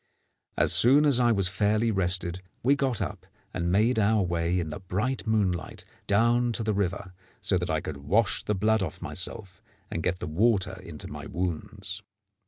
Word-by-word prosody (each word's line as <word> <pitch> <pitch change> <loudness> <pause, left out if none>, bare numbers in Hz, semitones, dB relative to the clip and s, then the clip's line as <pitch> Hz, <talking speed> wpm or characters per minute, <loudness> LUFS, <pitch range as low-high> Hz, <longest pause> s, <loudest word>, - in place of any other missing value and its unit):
As - - +5
soon 140 +5 +6
as 140 -4 +5
I 120 -1 +4
was 100 -4 +2
fairly 105 +4 +1
rested, 90 -2 0 0.2
we 135 +4 +4
got 135 -4 0
up 95 -2 -7 0.3
and 85 -1 -1
made 110 +5 +2
our 105 0 +3
way 85 0 0
in 80 -3 -3
the 75 - -6
bright 105 +8 -3
moonlight 100 -6 -1 0.2
down 120 +4 +3
to 115 - -2
the 110 0 0
river, 100 -1 -2 0.3
so 95 - +1
that 90 +1 -4
I 80 -1 0
could 75 - -6
wash 100 +11 +1
the 105 - -1
blood 110 +2 +2
off 90 -5 -4
myself 95 -1 -3 0.3
and 85 - -3
get 90 +2 -1
the - - -4
water 95 +2 +1
into 85 -5 -9
my - - -8
wounds. 90 +2 -4
100 Hz, 185 wpm, -27 LUFS, 90-110 Hz, 0.3 s, soon